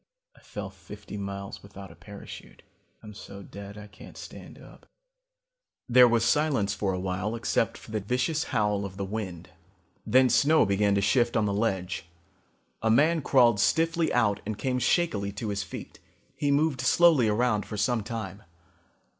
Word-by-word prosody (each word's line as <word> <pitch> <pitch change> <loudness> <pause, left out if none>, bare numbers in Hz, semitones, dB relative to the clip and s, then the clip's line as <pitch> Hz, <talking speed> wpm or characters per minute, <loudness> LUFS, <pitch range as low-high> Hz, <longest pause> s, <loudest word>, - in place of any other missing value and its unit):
I - - -20
fell 100 -2 -7
fifty 100 +3 -11
miles 100 -1 -6
without 100 -1 -11
a - - -15
parachute. 100 -1 -12 0.4
I'm 105 - -10
dead 100 0 -10
so 105 - -9
I - - -10
can't 105 - -14
stand - - -11
up." - - -16 1.0
There 125 0 +7
was 115 -1 +2
silence 130 -8 +1
for 95 0 -1
a 90 - -3
while 95 +4 -2
except 115 - 0
for - - -13
the 110 - -1
vicious 125 - -1
howl 105 -1 0
of 95 -1 -7
the 100 - -3
wind. 95 -4 -6 0.5
Then 130 +1 +4
snow 150 +5 +4
began 100 0 +2
to 100 - +2
shift 120 +2 +2
on 110 - +2
the 100 - -1
ledge. 95 -5 -2 0.7
A 110 - +1
man 155 +8 +3
crawled 120 -6 +4
stiffly 165 - +2
out 105 -4 +1
and 110 0 -4
came 125 0 -1
shakily 110 - +1
to 105 +2 -4
his 100 -1 -2
feet. 90 -2 -9 0.4
He 145 - -1
moved 140 -2 +1
slowly 145 -2 +4
around 105 0 +1
for 105 - -6
some 115 +2 +1
time. 105 -3 -6
105 Hz, 170 wpm, -27 LUFS, 100-125 Hz, 1.0 s, There